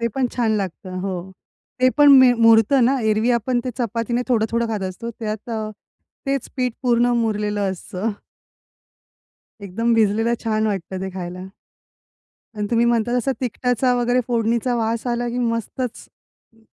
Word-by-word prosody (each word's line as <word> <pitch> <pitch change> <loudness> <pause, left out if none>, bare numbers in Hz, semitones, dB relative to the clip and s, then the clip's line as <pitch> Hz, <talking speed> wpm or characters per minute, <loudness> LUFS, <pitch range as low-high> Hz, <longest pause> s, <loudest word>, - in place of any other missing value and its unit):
ते 235 - 0
पण 260 -2 0
छान 225 -3 +1
लागतं. 185 -1 -5
हो, 190 0 -3 0.6
ते 255 0 +4
पण 290 -1 +8
मे 255 -1 +7
मुरतं 225 +4 +5
ना? 260 +3 +3 0.2
एरवी 215 +3 +1
आपण 245 +2 -1
ते 255 - -2
चपातीने 235 +1 -1
थोडं-थोडं 235 -1 +1
खात 215 -3 -3
असतो 230 +6 -7
त्यात 215 -1 -6
अ, 220 -1 -3 0.6
तेच 275 -2 -1
पीठ 250 -2 0
पूर्ण 240 -1 +3
मुरलेलं 210 -3 -1
असतं. 195 +3 -4 1.5
एकदम 225 +5 -1
भिजलेलं 225 +2 +2
छान 215 0 +1
वाटतं 190 0 -5
ते 190 - -4
खायला. 180 +1 -6 1.1
अन् 210 - -1
तुम्ही 235 0 +3
म्हणता 235 0 +1
तसा 255 +3 0
तिकटाचा 250 +1 0
वगैरे 245 +1 +2
फोडणीचा 235 +1 0
वास 230 +1 -1
आला 240 0 -1
की 240 +1 -3
मस्तच, 235 +1 -3 0.5
हं. 225 - -26
230 Hz, 150 wpm, -21 LUFS, 210-245 Hz, 1.5 s, पण